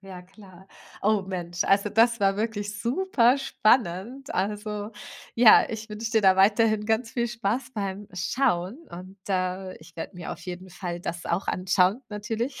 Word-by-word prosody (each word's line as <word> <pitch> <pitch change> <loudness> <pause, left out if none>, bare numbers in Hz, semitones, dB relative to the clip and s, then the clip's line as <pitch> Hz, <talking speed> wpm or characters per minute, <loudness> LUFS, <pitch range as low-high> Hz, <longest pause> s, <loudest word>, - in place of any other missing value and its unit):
ja 190 -2 -10
klar. 190 -1 -16 0.4
Oh 210 -1 +2
Mensch, 175 -2 -3
also 200 +1 +3
das 230 +1 +3
war 195 0 +3
wirklich 210 -1 -3
superspannend. 245 - +1
Also, 210 +2 -3 0.4
ja, 230 -1 +7
ich 220 0 -6
wünsche 220 +1 -5
dir 220 -2 +3
da 190 -1 +5
weiterhin 210 +2 +3
ganz 225 +1 0
viel 235 -1 0
Spaß 235 +3 -2
beim 200 -1 -4
Schauen 185 - 0
und, 185 +3 -10
äh, 185 0 -2
ich 160 - -17
werde 170 +3 -7
mir 175 - -5
auf - - -10
jeden 180 +1 -8
Fall 175 -1 -5
das 170 0 -5
auch 170 +3 -1
anschauen, 185 +5 +2
natürlich. 225 +5 -4
205 Hz, 155 wpm, -26 LUFS, 185-225 Hz, 0.4 s, ja